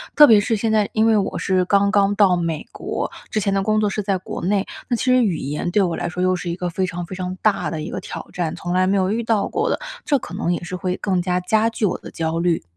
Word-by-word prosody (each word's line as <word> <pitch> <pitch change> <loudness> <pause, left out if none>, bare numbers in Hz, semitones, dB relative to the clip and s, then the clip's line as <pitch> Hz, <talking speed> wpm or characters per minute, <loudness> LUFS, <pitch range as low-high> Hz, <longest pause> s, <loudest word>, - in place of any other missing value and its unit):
特 300 - +10
别 220 -6 +7
是 225 +2 0
现 220 +1 -1
在 215 -2 +2
因 220 0 +3
为 225 -1 +4
我 195 - -1
是 185 -2 +1
刚 200 +1 +3
刚 200 -1 +3
到 200 -3 +5
美 165 -3 -2
国， - - -4 0.2
之 215 - 0
前 200 0 0
的 195 - +1
工 215 +2 +1
作 210 - +2
是 210 - -2
在 195 -1 0
国 185 - -7
内， 200 0 +1 0.2
那 240 - +1
其 - - -3
实 255 0 +4
语 190 -6 +1
言 145 +5 -3
对 205 - +3
我 175 -3 -1
来 - - -2
说 180 +1 -3
又 185 0 +3
是 175 - -5
一 170 - -2
个 180 0 -3
非 185 +2 -1
常 175 -1 -5
非 175 - -9
常 185 0 -4
大 210 -2 +1
的 160 -2 -4
一 - - -5
个 - - -3
挑 - - -7
战， 170 -3 -2
从 175 +1 -4
来 185 0 +3
没 200 - +2
有 190 0 +1
遇 225 +2 0
到 220 -3 +1
过 - - 0
的， - - +1 0.3
这 285 - +3
可 180 - -9
能 180 -3 -1
也 175 - -4
是 175 +1 -5
会 180 +1 -2
更 185 -3 0
加 180 0 0
加 220 +5 +2
剧 225 -1 -1
我 195 - 0
的 - - -11
焦 165 0 -2
虑。 170 -1 +1
190 Hz, 320 characters per minute, -21 LUFS, 180-210 Hz, 0.3 s, 特